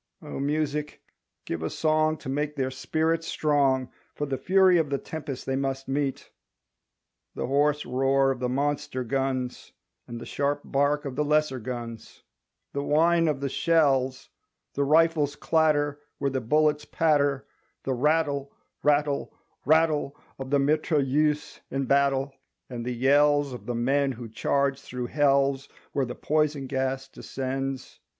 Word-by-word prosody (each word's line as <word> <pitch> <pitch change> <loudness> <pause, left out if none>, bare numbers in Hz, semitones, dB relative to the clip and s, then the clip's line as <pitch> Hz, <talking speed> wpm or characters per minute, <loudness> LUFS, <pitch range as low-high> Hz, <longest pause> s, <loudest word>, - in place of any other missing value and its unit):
O - - -6
Music 150 +1 -2 0.5
give 85 - -4
a 80 - -2
song 155 0 +1
To - - -11
make 145 +2 -2
their 130 -2 -1
spirit 160 +5 -1
strong 140 -5 +1 0.2
For 145 - -2
the 135 -2 -2
fury 185 -1 +4
of 155 -3 0
the 140 - 0
tempest 145 -3 -6
they 135 - -1
must 135 0 -2
meet. 135 0 -2 1.0
The - - -2
hoarse 145 +3 +1
roar 135 +2 +2
Of 130 - -4
the 125 0 -1
monster 140 -1 -1
guns; 130 0 -2 0.3
And 120 0 -7
the - - -8
sharp 145 0 -1
bark 145 +2 +1
Of 135 -2 -5
the 150 - +1
lesser 150 -3 +1
guns; 115 -1 -7 0.5
The 140 - -1
whine 165 +3 +3
of 145 -3 -1
the 140 - 0
shells, 135 -4 +1 0.4
The 140 - 0
rifles' 155 -1 +3
clatter 145 -2 +1 0.2
Where 140 -1 -1
the 130 -1 -1
bullets 150 +5 +2
patter, 145 -4 +1 0.4
The 135 - -1
rattle, 145 +1 +1 0.3
rattle, 145 -1 +1 0.3
rattle 155 -1 +2 0.2
Of 135 -1 -5
the 145 - +3
mitrailleuse 150 0 +1
in 135 0 -2
battle, 140 0 +2 0.4
And 120 -1 -5
the 125 0 -3
yells 145 +2 +3
Of 115 -3 -9
the 120 - -2
men 135 +3 +1
who 120 -1 -8
charge 140 +4 0
through 125 0 -5
hells 140 -1 +2 0.2
Where 140 -2 0
the 125 - -6
poison 150 -2 0
gas 130 0 -2
descends. 135 0 -5
140 Hz, 150 wpm, -26 LUFS, 135-150 Hz, 1.0 s, fury